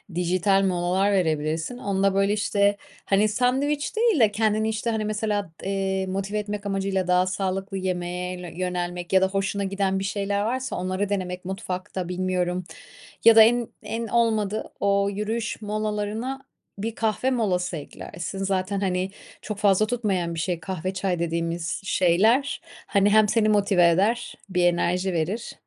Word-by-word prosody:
dijital 185 Hz, +3 st, +2 dB
molalar 185 Hz, +2 st, +1 dB
verebilirsin. 160 Hz, +2 st, 0 dB
Onda, 195 Hz, -3 st, +1 dB
böyle, 195 Hz, +1 st, +2 dB
işte, 205 Hz, -1 st, +2 dB, 0.3 s
hani, 205 Hz, +2 st, +3 dB
sandviç 270 Hz, -, 0 dB
değil 445 Hz, -, +3 dB
de 215 Hz, -2 st, +5 dB
kendini, 215 Hz, +1 st, +1 dB
işte, 220 Hz, +2 st, -2 dB
hani, 220 Hz, -2 st, -1 dB
mesela, 210 Hz, -3 st, -1 dB
eee, 190 Hz, 0 st, -1 dB
motive 195 Hz, +2 st, -2 dB
etmek 205 Hz, 0 st, -5 dB
amacıyla 195 Hz, -2 st, -1 dB
daha 180 Hz, 0 st, +4 dB
sağlıklı 190 Hz, +1 st, -2 dB
yemeğe 180 Hz, -1 st, -3 dB
lö -, -, -6 dB
yönelmek 180 Hz, 0 st, -3 dB
ya 190 Hz, -, +6 dB
da 190 Hz, -, +4 dB
hoşuna 195 Hz, +1 st, -1 dB
giden 195 Hz, 0 st, 0 dB
bir -, -, -3 dB
şeyler 200 Hz, 0 st, -1 dB
varsa, 255 Hz, +4 st, -2 dB
onları 185 Hz, +2 st, -2 dB
denemek 180 Hz, -2 st, -3 dB
mutfakta, 185 Hz, -2 st, -4 dB
bilmiyorum. 180 Hz, 0 st, -1 dB, 0.6 s
Ya 230 Hz, -1 st, +8 dB
da 220 Hz, -, +11 dB
en 235 Hz, +1 st, +3 dB
en 230 Hz, 0 st, -4 dB
olmadı 220 Hz, -3 st, 0 dB
o 200 Hz, 0 st, +2 dB
yürüyüş 220 Hz, +2 st, -3 dB
molalarına 215 Hz, +4 st, -2 dB, 0.4 s
bir 220 Hz, +3 st, -3 dB
kahve 225 Hz, +4 st, 0 dB
molası 185 Hz, -8 st, 0 dB
eklersin 170 Hz, +5 st, -7 dB
zaten, 195 Hz, +1 st, -1 dB
hani, 185 Hz, 0 st, -1 dB, 0.3 s
çok 210 Hz, -2 st, -5 dB
fazla 205 Hz, 0 st, +3 dB
tutmayan 195 Hz, -8 st, -1 dB
bir 165 Hz, -, -3 dB
şey 170 Hz, -1 st, -2 dB
kahve, 185 Hz, +1 st, -4 dB
çay 185 Hz, -2 st, -1 dB
dediğimiz 170 Hz, 0 st, -2 dB
şeyler, 215 Hz, +10 st, +2 dB, 0.3 s
hani, 200 Hz, +1 st, +3 dB
hem 215 Hz, 0 st, +5 dB
seni 215 Hz, 0 st, +2 dB
motive 200 Hz, -4 st, +4 dB
eder, 205 Hz, +8 st, +1 dB
bir 180 Hz, -2 st, +1 dB
enerji 180 Hz, +2 st, +1 dB
verir 180 Hz, +8 st, -2 dB
195 Hz, 150 wpm, -25 LUFS, 180-215 Hz, 0.6 s, da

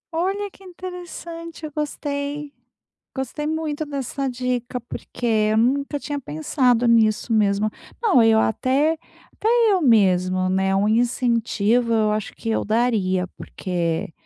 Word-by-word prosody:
Olha, 390 Hz, +4 st, 0 dB
que 390 Hz, -, -19 dB
interessante. 345 Hz, -3 st, -8 dB
Eu 300 Hz, -, -7 dB
gostei. 290 Hz, -1 st, -4 dB, 0.6 s
Gostei 280 Hz, +3 st, -3 dB
muito 310 Hz, -1 st, -2 dB
dessa 275 Hz, -1 st, -3 dB
dica, 250 Hz, -1 st, -2 dB
porque 240 Hz, +1 st, -7 dB
eu 215 Hz, -2 st, +2 dB
nunca 275 Hz, +5 st, +1 dB
tinha 290 Hz, 0 st, -4 dB
pensado 245 Hz, -, +1 dB
nisso 225 Hz, -1 st, +3 dB
mesmo. 210 Hz, -1 st, +2 dB, 0.3 s
Não, 375 Hz, -, +5 dB
eu 225 Hz, -1 st, +5 dB
até 275 Hz, +8 st, +2 dB, 0.4 s
até 435 Hz, -, -3 dB, 0.2 s
eu 375 Hz, -, +2 dB
mesmo, 185 Hz, -, +3 dB
né 190 Hz, +1 st, +1 dB
um 195 Hz, +1 st, +2 dB
incentivo, 235 Hz, 0 st, +1 dB
eu 215 Hz, -1 st, +2 dB
acho 215 Hz, -1 st, -3 dB
que 225 Hz, -, -5 dB
eu 220 Hz, -, 0 dB
daria, 215 Hz, -5 st, +1 dB
porque, 170 Hz, -3 st, -3 dB
245 Hz, 130 wpm, -22 LUFS, 215-295 Hz, 0.6 s, Não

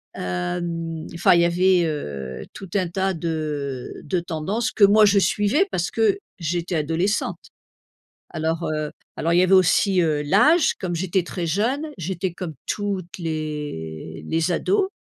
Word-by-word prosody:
Hem, 165 Hz, -, -3 dB
enfin 170 Hz, +1 st, +4 dB
il 170 Hz, -, +5 dB
y -, -, +4 dB
avait, 180 Hz, +1 st, +3 dB
heu, 70 Hz, -, -4 dB
tout 195 Hz, -, -9 dB
un 185 Hz, -3 st, +1 dB
tas 190 Hz, +2 st, 0 dB
de 150 Hz, -6 st, -3 dB
de 185 Hz, -, -1 dB
tendances 175 Hz, +7 st, -2 dB
que 210 Hz, -, +2 dB
moi 210 Hz, +2 st, +7 dB
je 200 Hz, -1 st, +5 dB
suivais, 210 Hz, -, +2 dB
parce 175 Hz, -1 st, -1 dB
que 225 Hz, -, +2 dB, 0.2 s
j'étais 175 Hz, +2 st, -2 dB
adolescente. 165 Hz, +7 st, 0 dB, 1.0 s
Alors, 160 Hz, +1 st, -1 dB
heu, 155 Hz, -1 st, -2 dB, 0.3 s
alors 165 Hz, +1 st, +1 dB
il -, -, +5 dB
y -, -, +5 dB
avait 185 Hz, +1 st, +2 dB
aussi, 185 Hz, +1 st, +4 dB
heu, 155 Hz, -3 st, +1 dB
l'âge, 275 Hz, -, +4 dB
comme 180 Hz, -4 st, -2 dB
j'étais 180 Hz, +2 st, 0 dB
très 175 Hz, 0 st, -4 dB
jeune, 235 Hz, -, 0 dB
j'étais 180 Hz, +1 st, -3 dB
comme 175 Hz, -2 st, -6 dB
toutes 195 Hz, -4 st, -3 dB
les 150 Hz, -, -5 dB
les 165 Hz, +2 st, 0 dB
ados, 390 Hz, -, +1 dB
170 Hz, 155 wpm, -23 LUFS, 155-195 Hz, 1.0 s, moi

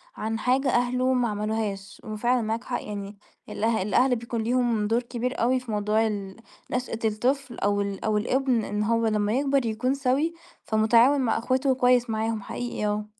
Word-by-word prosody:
عن 225 Hz, +1 st, -3 dB
حاجة 260 Hz, +4 st, +1 dB
أهله 250 Hz, +1 st, +1 dB
ما 245 Hz, -2 st, +2 dB
عملوهاش. 210 Hz, -2 st, -3 dB
وفعلًا 235 Hz, +3 st, 0 dB
معاك 225 Hz, +2 st, -2 dB
حق. 245 Hz, -, -3 dB
يعني 200 Hz, -1 st, -6 dB, 0.3 s
الأه 225 Hz, -1 st, 0 dB
الأهل 245 Hz, +6 st, +3 dB
بيكون 235 Hz, 0 st, -4 dB
ليهم 235 Hz, -3 st, +1 dB
دور 230 Hz, +2 st, +2 dB
كبير 245 Hz, +1 st, -3 dB
أوي 255 Hz, +2 st, +3 dB
في 245 Hz, -3 st, -8 dB
موضوع 210 Hz, +2 st, +1 dB
ال 200 Hz, -3 st, -4 dB, 0.4 s
نشأة 245 Hz, -2 st, -2 dB
الطفل 245 Hz, +4 st, -1 dB
أو 205 Hz, 0 st, +1 dB
ال 200 Hz, 0 st, -4 dB
أو 215 Hz, -1 st, +2 dB
الابن 250 Hz, +1 st, +1 dB
إن 210 Hz, +1 st, -2 dB
هو 230 Hz, +1 st, +1 dB
لمّا 210 Hz, 0 st, +1 dB
يكبر 275 Hz, -1 st, +1 dB
يكون 235 Hz, +4 st, 0 dB
سَوِي، 280 Hz, +4 st, 0 dB, 0.3 s
فمُتعاون 230 Hz, +6 st, +4 dB
مع 230 Hz, -3 st, +1 dB
إخواته 260 Hz, +3 st, 0 dB
وكويس 250 Hz, -1 st, +3 dB
معاهم 220 Hz, 0 st, -1 dB
حقيقي 240 Hz, +1 st, -4 dB
آه. 210 Hz, 0 st, -1 dB
230 Hz, 175 wpm, -26 LUFS, 215-250 Hz, 0.4 s, فمُتعاون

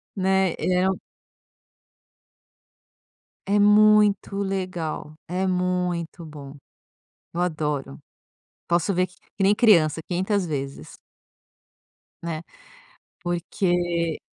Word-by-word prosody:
Né? 190 Hz, -2 st, +2 dB
Eh 180 Hz, 0 st, +2 dB, 2.6 s
É 200 Hz, +2 st, +2 dB
muito 210 Hz, -1 st, +5 dB
legal. 185 Hz, -6 st, -3 dB
É 185 Hz, +2 st, -1 dB
muito 180 Hz, -2 st, -1 dB
bom. 145 Hz, -3 st, -10 dB, 0.8 s
Eu 170 Hz, -, -3 dB
adoro. 150 Hz, -, -2 dB, 0.7 s
Posso 175 Hz, +3 st, +1 dB
ver 180 Hz, +1 st, +2 dB
que 185 Hz, -, -22 dB, 0.2 s
que 195 Hz, -, 0 dB
nem 200 Hz, -, +5 dB
criança 170 Hz, -9 st, +4 dB
500 190 Hz, +2 st, 0 dB
vezes. 140 Hz, -, -5 dB, 1.3 s
Né? 165 Hz, -1 st, -4 dB, 0.8 s
Porque 175 Hz, -1 st, 0 dB
180 Hz, 85 wpm, -24 LUFS, 165-190 Hz, 2.6 s, muito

